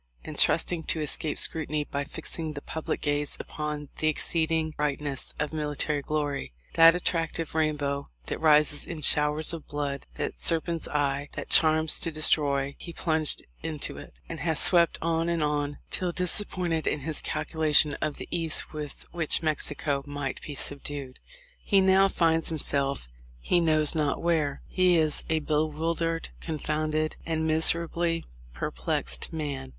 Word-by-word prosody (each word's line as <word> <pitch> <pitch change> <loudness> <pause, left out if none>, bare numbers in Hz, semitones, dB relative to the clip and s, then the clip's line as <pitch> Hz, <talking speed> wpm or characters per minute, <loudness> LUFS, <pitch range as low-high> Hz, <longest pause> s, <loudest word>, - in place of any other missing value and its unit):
and - - -5
trusting 175 -2 +3
to 160 - -1
escape 150 0 -2
scrutiny 155 -1 +2
by 140 -1 -4
fixing 155 +2 -3
the 145 - -7
public 160 - -4
gaze 145 -1 -1
upon 150 -1 -5
the 155 - +1
exceeding 160 +1 +1
bright 150 -2 -2
ness 140 -3 -5
of 150 +1 -3
military 150 -1 -2
glory, 145 - -3
— - - -32
that 165 0 +7
attractive 165 -2 -2
rainbow 150 -3 -1 0.2
that - - -4
rises 150 -2 +5
in 165 -3 -6
showers 150 +3 +4
of 165 -2 -8
blood, 145 -1 -4
that - - -4
serpent's 165 0 0
eye 145 -1 -1
that - - -7
charms 160 -1 +5
to - - -1
destroy, 140 -3 +2
— - - -36
he 170 - -8
plunged 160 -3 +1 0.2
into 155 -3 -4
it, - - -14
and - - -7
has 160 -3 0
swept 170 -2 +4
on 165 0 0
and 170 -2 0
on, 145 -1 -1
till 180 -1 0
disappointed 180 -2 -1
in 150 - -1
his 155 +2 -3
calculation 155 -1 +3
of 150 - -2
the - - -8
ease 165 -2 0
with 150 -2 -7
which 170 -1 0
Mexico 145 -2 +1
might 145 -2 -5
be 145 - -8
subdued, 140 -2 -4 0.4
he 200 - +3
now 190 +1 +5
finds 165 -3 +1
himself 140 - -1 0.3
he 175 - +1
knows 155 -3 +4
not 150 -3 0
where. 160 -4 -1
He 185 -2 +3
is 155 -2 +2
a 160 -1 +1
bewildered, 160 +2 -1
confounded, 155 -1 -2
and 160 -1 -2
miserably 165 +1 +3 0.3
perplexed - - -2
man. 140 -4 -5
155 Hz, 155 wpm, -27 LUFS, 145-165 Hz, 0.4 s, that